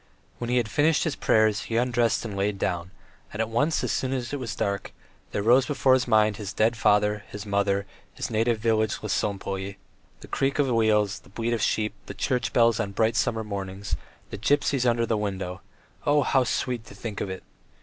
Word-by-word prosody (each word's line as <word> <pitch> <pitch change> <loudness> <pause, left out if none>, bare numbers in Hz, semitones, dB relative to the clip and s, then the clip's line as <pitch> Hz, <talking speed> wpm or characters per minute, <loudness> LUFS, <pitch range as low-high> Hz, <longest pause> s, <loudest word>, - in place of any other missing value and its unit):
When 120 - -3
he 125 - +2
had 120 -3 +1
finished 150 +6 +2
his 160 -4 -1
prayers 110 -2 +2
he 115 - -1
undressed 120 -1 +1
and 105 -3 -5
lay 100 +1 +1
down, 90 -2 -2 0.4
and 105 - -7
at 110 0 0
once, 145 +8 +1
as - - 0
soon 130 0 -1
as 125 0 -3
it 145 - -2
was 115 -3 -4
dark, 100 -1 -2 0.4
there 100 - -1
rose 125 +4 +5
before 135 -2 +3
his 130 -1 +2
mind 110 -3 +3
his 100 -2 -5
dead 115 +2 +2
father, 105 -1 +2
his 105 0 -7
mother, 100 -1 +1 0.3
his - - -4
native 115 +1 +2
village 110 -1 +1
Lesopolye... 100 -1 -2 0.5
the - - -10
creak 135 0 0
of 145 -2 +3
wheels, 105 -4 +2
the - - -21
bleat 115 +4 -2
of 115 - -1
sheep, 105 -1 +1
the - - -7
church 125 -3 -1
bells 115 -2 +4
on 100 - -2
bright 110 +3 +2
summer 110 -2 +1
mornings, 100 -1 -4 0.4
the - - -6
gypsies 135 +1 +2
under 115 0 +1
the 115 -1 0
window 95 -3 -3 0.5
oh, 145 0 +4
how 130 -1 +3
sweet 120 -1 -1
to - - -12
think 105 0 -5
of - - -2
it! 95 0 -6
110 Hz, 205 wpm, -26 LUFS, 100-120 Hz, 0.5 s, rose